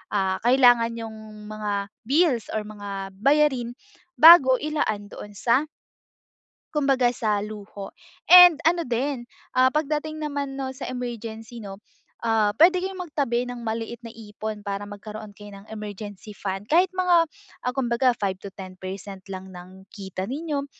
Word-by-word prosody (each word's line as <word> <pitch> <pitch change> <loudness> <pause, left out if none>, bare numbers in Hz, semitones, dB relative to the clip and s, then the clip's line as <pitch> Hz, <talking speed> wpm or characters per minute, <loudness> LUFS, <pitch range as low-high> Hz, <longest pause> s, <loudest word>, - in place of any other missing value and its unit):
ah, 190 -1 0
kailangan, 245 -3 +5
nyo'ng 225 -1 -7 0.3
mga 210 -1 -3 0.3
bills 280 -4 +2
or 215 - -1
mga 200 -2 -7
bayarin 265 -2 +2 0.4
bago 310 -6 +9
ilaan 230 -9 -2
doon 205 0 -10
sa 255 +8 +2 1.1
Kumbaga, 270 -4 +3
sa 210 -2 0
luho. 205 -1 -8 0.4
And 355 -3 +9
ano 335 +2 +2
din, 245 +1 -2 0.3
ah, 255 0 +5
pagdating 310 +1 -2
naman 285 -2 -3
'no, 270 -1 -4
sa - - -6
emergency 230 -2 -6
'no, 195 0 -9 0.4
ah, 225 -2 +2
puwede 340 - +5
kayong 380 0 -4
magtabi 250 -5 -1
ng 245 -1 -7
maliit 230 +1 -4
na 230 - -8
ipon 215 -1 -7
para 200 0 -4
magkaroon 210 +1 -9
kayo 205 0 -12
ng 200 +1 -13
emergency 210 -1 -8
fund 195 +1 -4
kahit 355 +4 +4
mga, 360 -2 +3 0.4
ah, 250 - 0
kumbaga 250 -1 +1
5-10% 190 0 -6
lang 190 0 -7
ng 185 +1 -13
kita 190 -3 -6
ninyo, 285 +1 -3
230 Hz, 140 wpm, -24 LUFS, 205-275 Hz, 1.1 s, bago